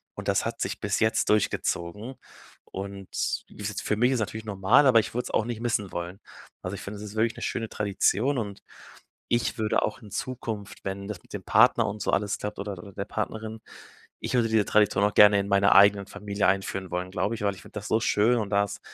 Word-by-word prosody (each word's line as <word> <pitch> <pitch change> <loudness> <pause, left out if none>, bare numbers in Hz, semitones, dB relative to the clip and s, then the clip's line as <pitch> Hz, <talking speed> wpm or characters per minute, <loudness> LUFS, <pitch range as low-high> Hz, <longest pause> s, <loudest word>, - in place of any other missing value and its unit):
und - - -7
das - - +2
hat - - -4
sich - - -2
bis - - 0
jetzt 110 0 +2
durchgezogen. 105 +2 -1 0.6
Und 100 0 -6 0.4
wie - - -12
s 105 +1 -3
für 105 - 0
mich 125 +3 +4
ist - - +2
es 120 - 0
natürlich 110 +1 -4
normal, 105 +8 +4
aber 115 -3 +7
ich - - -3
würde 125 +1 -2
es - - -6
auch 110 - +1
nicht 120 -1 -5
missen 110 -5 -1
wollen. 85 +2 -5 0.4
Also, 90 +2 -4
ich - - -8
finde, 100 +1 -7
es 105 - -8
ist 105 - -9
wirklich 110 +1 +1
'ne - - -6
schöne 115 -2 -2
Tradition 105 +6 +1
und 100 -3 -5 0.7
ich 120 0 0
würde 110 -1 +1
auch 110 - -3
in 105 -4 -13
Zukunft, 110 -5 -5
wenn 100 +1 -4
das 105 -5 -7
mit - - -23
dem - - -4
Partner - - +4
und 105 +1 -5
so - - 0
alles 100 0 0
klappt 105 -1 -5
oder 100 0 -4
oder 100 +2 -10
der 100 +1 -4
Partnerin. 110 +1 -4 0.6
Ich - - -4
würde 120 -2 +3
diese 110 -2 +3
Tradition 105 -2 +3
auch 105 - +1
gerne 105 -1 +7
in 100 - -3
meiner 100 0 +4
eigenen 100 0 +6
Familie 100 0 -2
einführen 95 -1 -1
wollen, 90 +1 -2
glaube 105 +2 -1
ich, 105 - -8
weil 100 -1 +1
ich - - -13
finde - - -15
das 105 -1 -5
so 110 - +3
schön 110 +2 +3
und 105 -3 -3
da 100 0 +3
ist 100 - -7
105 Hz, 240 wpm, -27 LUFS, 100-110 Hz, 0.7 s, aber